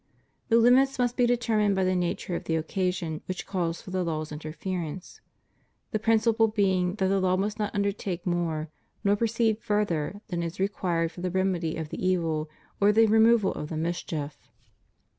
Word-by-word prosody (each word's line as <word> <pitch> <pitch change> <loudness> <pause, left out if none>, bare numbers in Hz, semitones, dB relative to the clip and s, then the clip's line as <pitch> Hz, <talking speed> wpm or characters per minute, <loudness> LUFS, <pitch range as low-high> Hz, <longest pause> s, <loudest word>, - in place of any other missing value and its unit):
The 230 - +5
limits 255 +4 +5
must 245 -1 +1
be 245 -2 +3
determined 220 -4 +2
by 190 - +1
the 185 0 +2
nature 175 0 -1
of - - -5
the 160 - 0
occasion 170 -1 -2
which 185 -1 -4
calls 170 -3 -2
for 185 - -9
the 185 -1 0
law's 155 -2 -3
interference 160 +3 -5 0.3
— - - -43
the 215 - 0
principle 225 +1 +3
being 190 -4 +1
that 190 -3 +1
the 195 +1 +2
law 185 0 +2
must 205 +3 -2
not 210 -1 -2
undertake 200 -3 -2
more, 165 -3 -1 0.3
nor 200 -1 +3
proceed 225 0 +1
further, 205 -3 -1
than 175 -3 -2
is 170 +2 -5
required 175 -4 0
for 175 - -10
the 185 - -1
remedy 180 -3 0
of 160 -2 -5
the - - -6
evil 165 -4 0 0.3
or 205 +1 +5
the 225 +2 +5
removal 220 -1 +4
of 150 - -6
the 160 - -4
mischief. 155 -3 -4
185 Hz, 180 wpm, -27 LUFS, 165-210 Hz, 0.3 s, The